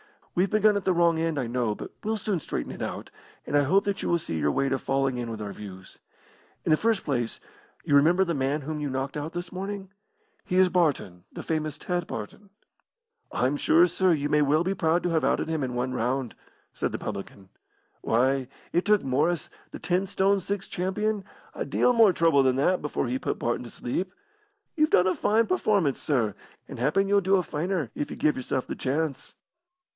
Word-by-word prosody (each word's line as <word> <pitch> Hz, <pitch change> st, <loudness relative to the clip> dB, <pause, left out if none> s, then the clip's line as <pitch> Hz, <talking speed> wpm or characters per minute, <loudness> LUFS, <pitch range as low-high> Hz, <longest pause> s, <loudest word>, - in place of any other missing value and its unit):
"We've 185 Hz, +2 st, +2 dB
begun 215 Hz, -1 st, +4 dB
at 200 Hz, -, -4 dB
the 185 Hz, -, +3 dB
wrong 170 Hz, -1 st, +3 dB
end, 165 Hz, -2 st, -1 dB
I 130 Hz, -, 0 dB
know, 120 Hz, -2 st, -1 dB
but -, -, -8 dB
we'll 220 Hz, +1 st, -1 dB
soon 200 Hz, -3 st, -1 dB
straighten -, -, -4 dB
it -, -, -8 dB
out, -, -, -5 dB, 0.3 s
and -, -, -2 dB
I 145 Hz, -, +5 dB
hope 190 Hz, +8 st, +3 dB
that 200 Hz, 0 st, -2 dB
you -, -, -2 dB
will 170 Hz, -, +3 dB
see 80 Hz, -, -4 dB
your 75 Hz, -1 st, +2 dB
way 135 Hz, -, +1 dB
to 135 Hz, -, 0 dB
falling 135 Hz, -1 st, 0 dB
in 120 Hz, -1 st, -3 dB
with 110 Hz, -1 st, -6 dB
our 100 Hz, -1 st, -5 dB
views. 95 Hz, -3 st, -10 dB, 0.7 s
In -, -, +1 dB
the 155 Hz, -, +6 dB
first 225 Hz, 0 st, +1 dB
place, 120 Hz, -5 st, -2 dB, 0.4 s
you -, -, -1 dB
remember 170 Hz, +6 st, +5 dB
the 170 Hz, -2 st, -1 dB
man 140 Hz, +1 st, 0 dB
whom 150 Hz, +2 st, -4 dB
you 145 Hz, -1 st, -2 dB
knocked 135 Hz, +2 st, -3 dB
out 150 Hz, +3 st, -5 dB
this 175 Hz, 0 st, -5 dB
morning? 195 Hz, +1 st, -5 dB, 0.5 s
He 180 Hz, -, -2 dB
is 185 Hz, 0 st, +5 dB
Barton 140 Hz, -, 0 dB
the -, -, -7 dB
famous 155 Hz, -2 st, -2 dB
Ted 175 Hz, +2 st, -2 dB
Barton." 195 Hz, -, -7 dB, 0.8 s
"I'm 130 Hz, +4 st, +1 dB
sure, 165 Hz, +4 st, +5 dB
sir, 180 Hz, +1 st, +2 dB
you 145 Hz, -2 st, 0 dB
may 150 Hz, -, +3 dB
well 150 Hz, +3 st, +3 dB
be 190 Hz, +2 st, 0 dB
proud 170 Hz, -1 st, +1 dB
to 180 Hz, -, 0 dB
have 165 Hz, -2 st, +1 dB
outed -, -, +1 dB
him 160 Hz, -3 st, -1 dB
in 125 Hz, -1 st, -3 dB
one 125 Hz, +1 st, -1 dB
round," 125 Hz, 0 st, -1 dB, 0.4 s
said -, -, -2 dB
the -, -, -1 dB
publican. 100 Hz, -2 st, -7 dB, 0.5 s
"Why, 130 Hz, +3 st, +1 dB, 0.3 s
it 175 Hz, -, +2 dB
took 210 Hz, -1 st, +3 dB
Morris, 150 Hz, +5 st, 0 dB, 0.2 s
the -, -, -9 dB
ten 185 Hz, +2 st, 0 dB
stone 195 Hz, +1 st, +2 dB
six 195 Hz, +1 st, -4 dB
champion, 200 Hz, +3 st, -2 dB, 0.3 s
a -, -, -3 dB
deal 250 Hz, -, +2 dB
more 225 Hz, -5 st, +6 dB
trouble 165 Hz, -4 st, +4 dB
than 130 Hz, -1 st, +3 dB
that 180 Hz, +7 st, +2 dB
before 150 Hz, -1 st, -2 dB
he 125 Hz, +2 st, -1 dB
put -, -, -2 dB
Barton 120 Hz, +1 st, -2 dB
to -, -, -8 dB
sleep. 180 Hz, +13 st, -4 dB, 0.6 s
You've 310 Hz, -2 st, +3 dB
done 180 Hz, -, +4 dB
a 185 Hz, -, +3 dB
fine 225 Hz, +2 st, +2 dB
performance, 205 Hz, -, +1 dB
sir, 120 Hz, -8 st, +1 dB, 0.3 s
and -, -, -8 dB
happen 160 Hz, +10 st, +2 dB
you'll 200 Hz, 0 st, +4 dB
do 190 Hz, +1 st, +3 dB
a 185 Hz, -, +2 dB
finer, 160 Hz, -, -2 dB
if 145 Hz, -, -3 dB
you -, -, -6 dB
give 150 Hz, -2 st, +2 dB
yourself 130 Hz, 0 st, -2 dB
the -, -, -5 dB
chance." 140 Hz, +1 st, -2 dB
155 Hz, 215 wpm, -26 LUFS, 130-185 Hz, 0.8 s, the